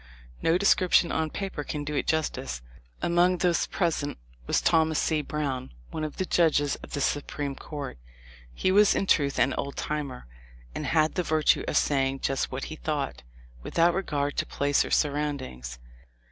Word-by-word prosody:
No 165 Hz, +2 st, +3 dB
description 185 Hz, -2 st, +4 dB
on 160 Hz, -1 st, 0 dB
paper 190 Hz, -4 st, -4 dB
can 145 Hz, 0 st, -4 dB
do 150 Hz, +1 st, -4 dB
it 145 Hz, -, -1 dB
justice. 130 Hz, -, -1 dB, 0.4 s
Among 175 Hz, +1 st, +3 dB
those 175 Hz, -1 st, +1 dB
present 160 Hz, -5 st, -1 dB, 0.3 s
was -, -, +3 dB
Thomas 160 Hz, -2 st, +3 dB
C. 155 Hz, -2 st, +1 dB
Brown, 140 Hz, -3 st, -3 dB, 0.2 s
one 155 Hz, -, -3 dB
of 155 Hz, -, -5 dB
the 185 Hz, -, 0 dB
judges 155 Hz, -5 st, +2 dB
of -, -, -12 dB
the 145 Hz, -, -1 dB
Su 145 Hz, +1 st, +1 dB
preme 140 Hz, -1 st, -4 dB
Court. 140 Hz, -, -7 dB, 0.5 s
He 125 Hz, -, 0 dB
was 205 Hz, +1 st, +5 dB
in -, -, +1 dB
truth 140 Hz, -7 st, +2 dB
an 130 Hz, +2 st, +3 dB
"old 140 Hz, 0 st, -3 dB
timer," 145 Hz, -4 st, -4 dB, 0.5 s
and -, -, -4 dB
had 155 Hz, -1 st, +3 dB
the 180 Hz, -, 0 dB
virtue 155 Hz, -3 st, +2 dB
of -, -, +1 dB
saying 135 Hz, -1 st, +1 dB
just 135 Hz, -1 st, -1 dB
what -, -, -4 dB
he -, -, -6 dB
thought, -, -, -3 dB, 0.4 s
without 170 Hz, -, +2 dB
regard 145 Hz, -6 st, -1 dB
to -, -, +1 dB
place 140 Hz, 0 st, +2 dB
or -, -, -6 dB
surroundings. 140 Hz, -, -1 dB
150 Hz, 175 wpm, -27 LUFS, 140-165 Hz, 0.5 s, was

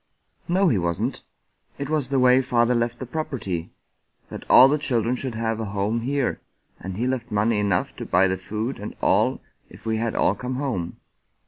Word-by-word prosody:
" -, -, -47 dB
No, 185 Hz, +3 st, +3 dB
he 115 Hz, -, +2 dB
wasn't." 95 Hz, +9 st, -2 dB, 0.3 s
" -, -, -41 dB
It 140 Hz, -, -4 dB
was 150 Hz, -3 st, 0 dB
the 140 Hz, -, +1 dB
way 130 Hz, 0 st, +5 dB
father 120 Hz, -2 st, +2 dB
left 120 Hz, 0 st, 0 dB
the 130 Hz, -, -6 dB
property 125 Hz, -, -4 dB, 0.3 s
— -, -, -42 dB
that -, -, -9 dB
all 130 Hz, -, +9 dB
the 150 Hz, +2 st, +1 dB
children 120 Hz, -4 st, 0 dB
should 125 Hz, -2 st, -4 dB
have 115 Hz, 0 st, -1 dB
a 110 Hz, -, -2 dB
home 105 Hz, +3 st, -1 dB
here 135 Hz, +2 st, -1 dB, 0.2 s
— -, -, -41 dB
and 95 Hz, +1 st, -6 dB
he 120 Hz, -, -1 dB
left 130 Hz, -2 st, -2 dB
money 105 Hz, +1 st, +1 dB
enough 100 Hz, -4 st, 0 dB
to -, -, -5 dB
buy 95 Hz, -, +4 dB
the 95 Hz, 0 st, -1 dB
food 110 Hz, +7 st, -4 dB
and 105 Hz, -, -7 dB
all -, -, +2 dB, 0.3 s
if -, -, -15 dB
we 110 Hz, 0 st, 0 dB
had 115 Hz, 0 st, -1 dB
all -, -, +3 dB
come 125 Hz, +1 st, -5 dB
home." 120 Hz, -11 st, -3 dB
120 Hz, 215 wpm, -24 LUFS, 105-130 Hz, 0.3 s, all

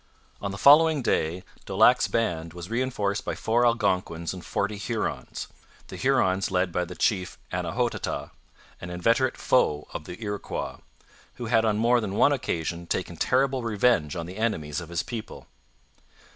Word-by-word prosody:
On 100 Hz, -, -2 dB
the 100 Hz, -, -5 dB
following 150 Hz, +3 st, +6 dB
day 85 Hz, -4 st, 0 dB, 0.2 s
Daulac's -, -, +5 dB
band 85 Hz, -8 st, -1 dB
was 90 Hz, +4 st, -8 dB
reinforced 115 Hz, -5 st, -1 dB
by -, -, -3 dB
four 120 Hz, +2 st, +2 dB
Algonquins 90 Hz, -7 st, 0 dB
and 90 Hz, -2 st, -9 dB
forty 105 Hz, 0 st, -2 dB
Hurons, 110 Hz, +1 st, -3 dB, 0.4 s
the -, -, -7 dB
Hurons 100 Hz, -8 st, +2 dB
led 90 Hz, -1 st, +1 dB
by 90 Hz, +1 st, 0 dB
the -, -, -9 dB
chief 95 Hz, -5 st, 0 dB, 0.2 s
Annahotaha, -, -, -2 dB, 0.5 s
an 90 Hz, -, -6 dB
inveterate 115 Hz, +9 st, +1 dB
foe 75 Hz, -12 st, +2 dB
of 75 Hz, -, -6 dB
the 90 Hz, -, -8 dB
Iroquois, 105 Hz, -1 st, -4 dB, 0.6 s
who 120 Hz, -, -6 dB
had 115 Hz, 0 st, +3 dB
on 105 Hz, -1 st, +2 dB
more 120 Hz, +2 st, +3 dB
than 100 Hz, -2 st, -3 dB
one 145 Hz, -, +5 dB
occasion 85 Hz, -, -2 dB
taken 90 Hz, -1 st, -2 dB
terrible 130 Hz, +7 st, +1 dB
revenge 110 Hz, -8 st, +2 dB
on 85 Hz, -2 st, -4 dB
the 90 Hz, +3 st, -9 dB
enemies 80 Hz, -9 st, -1 dB
of 85 Hz, -, -9 dB
his 85 Hz, 0 st, -1 dB
people. 115 Hz, -3 st, -7 dB
100 Hz, 160 wpm, -26 LUFS, 90-120 Hz, 0.6 s, following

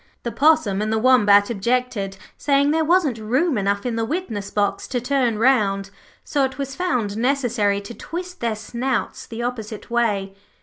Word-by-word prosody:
The 235 Hz, -, -3 dB
Possum 240 Hz, -6 st, +3 dB
and 215 Hz, +1 st, -1 dB
the 220 Hz, -, +1 dB
Wombat 210 Hz, -3 st, +5 dB
objected, 225 Hz, -2 st, -1 dB, 0.2 s
saying 280 Hz, 0 st, +2 dB
there 320 Hz, +1 st, +2 dB
wasn't 310 Hz, -8 st, +2 dB
room 260 Hz, +9 st, +1 dB
enough 200 Hz, 0 st, 0 dB
in 235 Hz, -2 st, -2 dB
the 225 Hz, -, 0 dB
witness 225 Hz, -, -3 dB
box 205 Hz, -1 st, -1 dB
to 250 Hz, -, -1 dB
turn 250 Hz, -3 st, 0 dB
round, 205 Hz, -5 st, +2 dB, 0.3 s
so 280 Hz, -, 0 dB
it 265 Hz, 0 st, -2 dB
was 275 Hz, -1 st, -4 dB
found 250 Hz, -, -1 dB
necessary 235 Hz, -5 st, +1 dB
to 200 Hz, +4 st, -9 dB
twist 360 Hz, +6 st, -7 dB
their 230 Hz, -2 st, -1 dB
snouts 240 Hz, +3 st, -3 dB
the 230 Hz, +1 st, -5 dB
opposite 225 Hz, -3 st, -5 dB
way. 205 Hz, -5 st, 0 dB
235 Hz, 170 wpm, -22 LUFS, 210-270 Hz, 0.3 s, Wombat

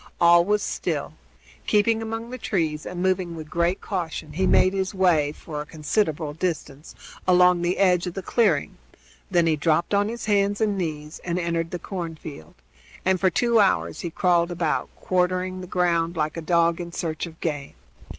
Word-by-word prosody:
All 170 Hz, 0 st, +6 dB
was 210 Hz, +2 st, +1 dB
still. 155 Hz, -5 st, -3 dB, 0.5 s
Keeping 220 Hz, +2 st, +3 dB
among 225 Hz, +1 st, -5 dB
the 255 Hz, -, -6 dB
trees 160 Hz, -8 st, -1 dB
and 180 Hz, 0 st, -4 dB
moving 185 Hz, -2 st, 0 dB
with 155 Hz, -1 st, -9 dB
great 170 Hz, +2 st, 0 dB
caution, 165 Hz, -5 st, -4 dB
he 185 Hz, +4 st, +1 dB
made 185 Hz, -, +4 dB
his 190 Hz, 0 st, -2 dB
way, 165 Hz, -6 st, +3 dB
for 150 Hz, 0 st, -7 dB
a -, -, -6 dB
considerable 155 Hz, -1 st, -1 dB
distance, 155 Hz, -3 st, -4 dB, 0.3 s
along 180 Hz, -1 st, +5 dB
the 175 Hz, +1 st, 0 dB
edge 180 Hz, -2 st, +3 dB
of 175 Hz, -, -5 dB
the 195 Hz, -, -4 dB
clearing; 235 Hz, +4 st, +1 dB, 0.5 s
then 175 Hz, -3 st, +3 dB
he 160 Hz, -1 st, +3 dB
dropped 155 Hz, +5 st, +1 dB
on 205 Hz, +1 st, +2 dB
his 235 Hz, 0 st, -5 dB
hands 205 Hz, -1 st, +2 dB
and 215 Hz, -2 st, +1 dB
knees 155 Hz, -4 st, -4 dB
and 175 Hz, 0 st, -2 dB
entered 170 Hz, -1 st, -1 dB
the 180 Hz, -, -4 dB
cornfield, 160 Hz, -, -7 dB, 0.5 s
and 185 Hz, 0 st, +2 dB
for 190 Hz, -, +3 dB
two 235 Hz, +5 st, +2 dB
hours 195 Hz, -2 st, +2 dB
he 175 Hz, -, -3 dB
crawled 170 Hz, 0 st, +2 dB
about, 170 Hz, -3 st, -1 dB
quartering 185 Hz, 0 st, -1 dB
the 180 Hz, -, -8 dB
ground 170 Hz, -2 st, 0 dB
like 155 Hz, 0 st, -1 dB
a 165 Hz, -, -4 dB
dog 170 Hz, +1 st, +2 dB
in 170 Hz, 0 st, -7 dB
search 165 Hz, 0 st, -3 dB
of 160 Hz, -1 st, -13 dB
game. 145 Hz, -4 st, -4 dB
175 Hz, 180 wpm, -24 LUFS, 160-190 Hz, 0.5 s, All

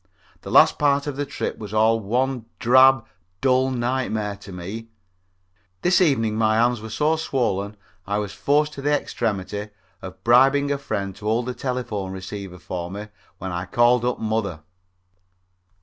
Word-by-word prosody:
The -, -, -8 dB
last -, -, +5 dB
part 140 Hz, -1 st, +2 dB
of 145 Hz, -2 st, -4 dB
the 145 Hz, 0 st, -3 dB
trip -, -, -4 dB
was 105 Hz, -1 st, -7 dB
all 110 Hz, +1 st, +4 dB
one 125 Hz, +3 st, -1 dB
drab, 130 Hz, 0 st, +5 dB, 0.3 s
dull 130 Hz, 0 st, +3 dB
nightmare 120 Hz, -5 st, -1 dB
to 100 Hz, 0 st, -12 dB
me. 95 Hz, +6 st, -7 dB, 1.0 s
This 180 Hz, +1 st, +4 dB
evening 115 Hz, -10 st, +2 dB
my 110 Hz, -1 st, +2 dB
hands 120 Hz, 0 st, +2 dB
were 110 Hz, -, -7 dB
so 150 Hz, +8 st, +1 dB
swollen 105 Hz, -9 st, -1 dB, 0.3 s
I 100 Hz, 0 st, 0 dB
was 105 Hz, -2 st, -3 dB
forced 145 Hz, +9 st, +1 dB
to 140 Hz, -, -7 dB
the 145 Hz, +1 st, +2 dB
extremity 105 Hz, -2 st, -3 dB, 0.3 s
of 95 Hz, 0 st, -10 dB
bribing 135 Hz, +4 st, +4 dB
a 140 Hz, -, -1 dB
friend 100 Hz, -8 st, -3 dB
to 105 Hz, -, -11 dB
hold 115 Hz, +2 st, +1 dB
the 125 Hz, -, -3 dB
telephone 120 Hz, -8 st, -3 dB
receiver 95 Hz, -1 st, -7 dB
for 90 Hz, -1 st, -5 dB
me 105 Hz, +3 st, -7 dB, 0.3 s
when 95 Hz, 0 st, -5 dB
I 90 Hz, +1 st, -3 dB
called 120 Hz, 0 st, +3 dB
up 125 Hz, 0 st, 0 dB
mother. 110 Hz, -7 st, -2 dB
115 Hz, 165 wpm, -23 LUFS, 100-130 Hz, 1.0 s, last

